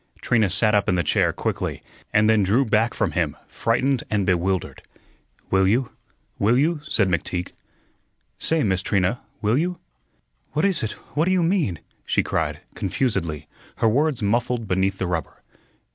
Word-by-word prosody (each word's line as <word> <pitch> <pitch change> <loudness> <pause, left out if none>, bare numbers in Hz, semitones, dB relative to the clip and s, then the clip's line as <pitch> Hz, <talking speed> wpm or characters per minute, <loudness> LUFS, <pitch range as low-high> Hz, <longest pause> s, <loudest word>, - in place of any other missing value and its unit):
Trina 110 -5 +2
sat 105 +3 +2
up 105 -1 +2
in 90 - +2
the 85 - +1
chair - - +2
quickly, - - -3 0.3
and 105 +1 +4
then 110 -1 +4
drew 110 +8 +3
back 110 +1 +1
from - - 0
him, - - -1
frightened 130 +3 0
and 105 -2 0
bewildered. 90 0 0 0.7
"Will 95 0 +4
you? 120 +5 +1 0.5
Will 110 +5 +3
you?" 155 +3 +1
said 100 - +2
McTeague. 90 0 -2 0.9
"Say, 160 -1 +1
Miss 95 -4 +1
Trina, 100 +5 0 0.2
will 110 +6 +3
you?" 180 +2 -1 0.8
"What 155 +5 +1
is 195 -4 +2
it? 110 - -2 0.2
What 155 +2 +2
do 185 - +1
you 185 -2 +3
mean?" 165 - 0 0.2
she - - +1
cried, - - -2
confusedly, 85 - -2 0.3
her 115 - +1
words 135 +1 +1
muffled 115 +2 0
beneath 95 +1 +1
the 95 - -2
rubber. 85 -4 -4
110 Hz, 160 wpm, -23 LUFS, 95-130 Hz, 0.9 s, and